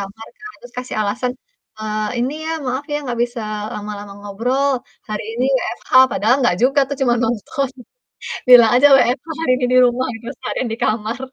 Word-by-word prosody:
kamarkan, 225 Hz, -, -10 dB
terus 245 Hz, -, -14 dB
kasih 250 Hz, -, -5 dB
alasan, 240 Hz, +5 st, -2 dB, 0.5 s
"Eee, 215 Hz, 0 st, -2 dB
ini 250 Hz, +3 st, 0 dB
ya -, -, -2 dB, 0.2 s
maaf 260 Hz, +3 st, -2 dB
ya -, -, +1 dB
nggak 245 Hz, -3 st, -4 dB
bisa 240 Hz, 0 st, -7 dB, 0.3 s
lama-lama 205 Hz, -1 st, -7 dB
ngobrol, 245 Hz, +8 st, -1 dB, 0.4 s
hari 215 Hz, 0 st, -3 dB
ini 240 Hz, +2 st, -1 dB, 0.2 s
WFH," -, -, -6 dB, 0.2 s
padahal 230 Hz, +5 st, +2 dB
nggak 180 Hz, -8 st, +2 dB
juga 275 Hz, +3 st, +4 dB
tuh 280 Hz, -, -4 dB
cuman 240 Hz, -2 st, +2 dB
nonton. 240 Hz, +4 st, -2 dB, 0.8 s
Bilang 240 Hz, -3 st, +9 dB
aja 270 Hz, +4 st, +7 dB
WFH 255 Hz, +5 st, +1 dB
hari 325 Hz, -, +1 dB
ini 250 Hz, -, 0 dB
di -, -, +5 dB
rumah 250 Hz, +1 st, 0 dB
gitu 225 Hz, +1 st, -11 dB
seharian 255 Hz, -, -3 dB
di -, -, -5 dB
kamar. 220 Hz, +2 st, -1 dB
240 Hz, 175 wpm, -19 LUFS, 215-255 Hz, 0.8 s, Bilang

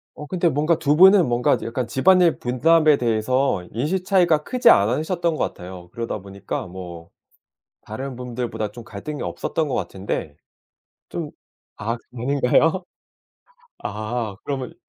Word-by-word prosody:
어 150 Hz, -, -8 dB
근데 175 Hz, 0 st, +1 dB
뭔가 155 Hz, +3 st, +1 dB
2 145 Hz, 0 st, +1 dB
분은 190 Hz, 0 st, +7 dB
뭔가 120 Hz, 0 st, +2 dB
약간 120 Hz, +1 st, -3 dB
집안일 175 Hz, +7 st, +4 dB
분담에 155 Hz, +5 st, +3 dB
대해서 120 Hz, -2 st, 0 dB
인식 155 Hz, -, -1 dB
차이가 175 Hz, -5 st, +3 dB
크지 250 Hz, +6 st, +3 dB
않으셨던 155 Hz, -, +2 dB
것 -, -, 0 dB
같아요. 90 Hz, -1 st, -10 dB
그러다 115 Hz, -2 st, -4 dB
보니까 100 Hz, -1 st, -6 dB
뭐 85 Hz, -2 st, -9 dB, 0.7 s
다른 130 Hz, +5 st, -6 dB
분들보다 120 Hz, -3 st, -4 dB
좀 120 Hz, +1 st, -10 dB
갈등이 115 Hz, +8 st, -6 dB
없었던 160 Hz, -2 st, -2 dB
것 135 Hz, -, -2 dB
같은데. 95 Hz, -6 st, -4 dB, 0.7 s
좀 -, -, -5 dB, 0.5 s
아 115 Hz, +3 st, -2 dB, 0.2 s
아닌가요? 140 Hz, +8 st, +2 dB, 0.9 s
아. 110 Hz, 0 st, -4 dB
그러면 135 Hz, -3 st, -4 dB
125 Hz, 280 characters per minute, -22 LUFS, 110-155 Hz, 0.9 s, 분은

